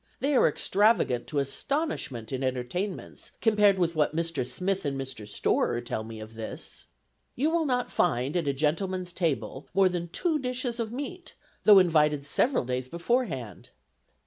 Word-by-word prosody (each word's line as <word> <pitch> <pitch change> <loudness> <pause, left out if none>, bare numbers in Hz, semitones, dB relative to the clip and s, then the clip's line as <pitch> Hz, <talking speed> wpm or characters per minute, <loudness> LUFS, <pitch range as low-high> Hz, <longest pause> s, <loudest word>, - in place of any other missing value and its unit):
they 280 +1 +1
are - - +6
extravagant 200 - +2
to 150 - -4
astonishment 140 - -2
in 130 0 -2
entertainments 130 +10 -4
compared 210 -3 +4
with 170 -2 +1
what 155 0 +1
Mr. 165 -5 -1
Smith 185 +10 -1
and 140 -2 -2
Mr. 130 -6 -6
Storer 105 +3 0
tell 120 -2 -4
me 110 0 -8
of 110 +1 -9
this. 110 -1 -7 0.5
You 295 +6 +1
will 330 -2 +1
not 250 -2 0
find 135 -3 +1
at 170 -4 0
a - - +3
gentleman's 175 +6 -1
table 155 -6 -2
more 190 -1 +5
than 175 -1 -3
two 320 - 0
dishes 250 -2 -2
of 225 -2 -2
meat, 290 +8 -6 0.3
though 210 -2 +9
invited 150 -5 +4
several 240 - +1
days 125 +1 -3
beforehand. 170 - -2
170 Hz, 160 wpm, -28 LUFS, 130-220 Hz, 0.5 s, though